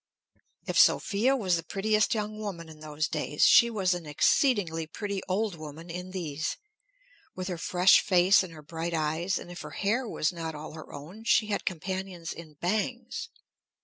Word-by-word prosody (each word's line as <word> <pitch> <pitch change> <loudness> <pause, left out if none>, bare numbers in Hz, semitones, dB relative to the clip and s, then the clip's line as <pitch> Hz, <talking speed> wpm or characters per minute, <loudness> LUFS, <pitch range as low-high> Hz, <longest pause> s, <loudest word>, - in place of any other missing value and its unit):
If - - +1
Sophia 230 +7 +4
was 185 -9 +1
the 165 - -5
prettiest 215 +5 +1
young 215 0 -3
woman 180 -6 -6
in 155 -1 -13
those 155 0 -2
days, 150 -1 -1
she 235 - +7
was 195 -5 +1
an 175 -3 -6
exceedingly 165 - +2
pretty 200 +4 -4
old 205 +2 0
woman 160 +1 -9
in 180 +2 -6
these, 165 -5 -3 0.8
with 185 0 -4
her 180 - -3
fresh 180 +1 +5
face 185 0 +5
and 185 -3 -6
her 155 -2 -12
bright 165 +2 -4
eyes, 160 +4 0
and 175 - -8
if 175 - -8
her - - -7 0.2
hair 235 +4 +1
was 155 - 0
not 165 -2 -5
all 150 +1 -7
her 155 -1 -10
own, 175 +11 -10
she 220 -2 +3
had 205 - -2
companions 185 -1 -4
in 160 -2 -11
bangs. 240 - -2
180 Hz, 180 wpm, -28 LUFS, 160-205 Hz, 0.8 s, she